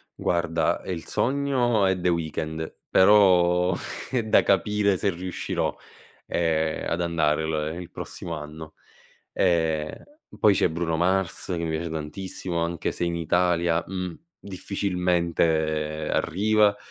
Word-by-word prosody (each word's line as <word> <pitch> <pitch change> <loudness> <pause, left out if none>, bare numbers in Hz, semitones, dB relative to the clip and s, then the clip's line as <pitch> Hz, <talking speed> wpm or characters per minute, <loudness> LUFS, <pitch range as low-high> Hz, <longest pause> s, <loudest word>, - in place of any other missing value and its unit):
Guarda, 85 -2 0
ehm, 95 - -4
il 80 - -8
sogno 125 -5 +1
è 95 -1 +1
The 90 - +1
Weeknd, 80 -1 -2 0.2
però 90 -2 +5 0.4
è 125 -3 +1
da 110 - +4
capire 100 +1 +2
se 100 +2 0
riuscirò, 90 0 -3 0.5
ehm, 80 -2 0
ad 85 - -1
andare 80 -2 +1
l 80 +2 -2
il 85 - -9
prossimo 85 - -6
anno. 75 +1 -9 0.6
Ehm, 80 -4 +1 0.4
e - - -13
poi 105 -2 +5
c'è - - +3
Bruno 80 0 -2
Mars, 95 +2 0
che 90 -3 -2
mi 80 - -2
piace 80 +1 -3
tantissimo 85 +3 -4
anche 85 0 -2
se - - -6
in 85 0 -1
Italia, 85 0 +1
mh, 90 -2 -4 0.2
difficilmente 85 -5 -1
arriva. 105 +3 +2
85 Hz, 130 wpm, -25 LUFS, 80-95 Hz, 0.6 s, però